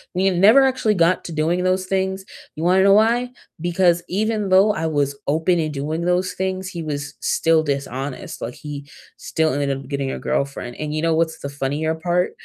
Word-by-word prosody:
we 190 +1 +2
never 210 +10 +6
actually 255 -5 +1
got 170 +1 +2
to 170 - -6
doing 165 +3 0
those 185 0 +1
things, 190 0 -2 0.3
you 155 - -5
wanna 185 +2 +4
know 200 0 +6
why? 235 +4 +3 0.3
Because 175 0 +2
even 210 +1 -1
though 195 +3 +5
I 160 -2 -2
was 145 -2 0
open 165 +4 +2
in 155 -1 -1
doing 150 +4 -3
those 180 +1 0
things, 190 0 -3
he 175 -3 -6
was 145 -2 -4
still 165 -1 +2
dishonest, 140 -2 -4
like, 120 - -5
he 145 -2 -8 0.3
still 160 -3 -1
ended 140 -1 -1
up 135 - -10
getting 140 -1 -2
a - - -4
girlfriend, 135 -3 -3
and 150 0 -4
you 155 - -1
know 165 - +2
what's 160 0 0
the 140 - -5
funnier 145 +3 -2
part? 175 +2 0
165 Hz, 200 wpm, -21 LUFS, 145-190 Hz, 0.3 s, never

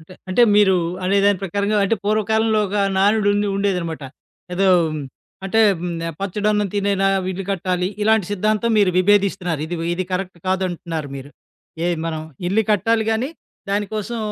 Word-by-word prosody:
అంటే 160 +4 -15
అంటే 185 +6 +3
మీరు 200 -2 +5 0.3
అనే 195 +2 +2
దాని 205 -2 +3
ప్రకారంగా, 200 +3 -1
అంటే 225 +3 +1
పూర్వకాలంలో 215 +1 +1
ఒక 205 - -3 0.2
నానుడు 205 +1 +3
ఉండే 205 0 0
ఉండేదనమాట. 180 -6 -2 0.5
ఏదో 195 +2 +2 0.8
అంటే 220 +4 +2 0.2
హ్మ్, 175 0 -3 0.2
'పచ్చడి 200 +2 -1
అన్నం 210 -1 +1
తినేనా 200 -1 +1 0.3
ఇల్లు 190 +1 -5
కట్టాలి' 180 -1 -1
ఇలాంటి 220 -2 +3
సిద్ధాంతం. 215 +3 0
మీరు 200 -3 +4
విభేదిస్తున్నారు. 185 -4 +2
ఇది, 175 +2 -4 0.2
ఇది 185 +1 -2
కరెక్ట్ 185 -1 -3
కాదంటున్నారు 175 -5 -2
మీరు. 135 +1 -9 0.5
ఎ - - +1 0.2
మనం 160 -1 -3 0.3
ఇల్లు 220 +4 +2
కట్టాలి 220 +2 +2
గానీ, 225 +4 0 0.4
దాని 205 +1 0
కోసం 225 +2 -3
200 Hz, 150 wpm, -20 LUFS, 180-210 Hz, 0.8 s, మీరు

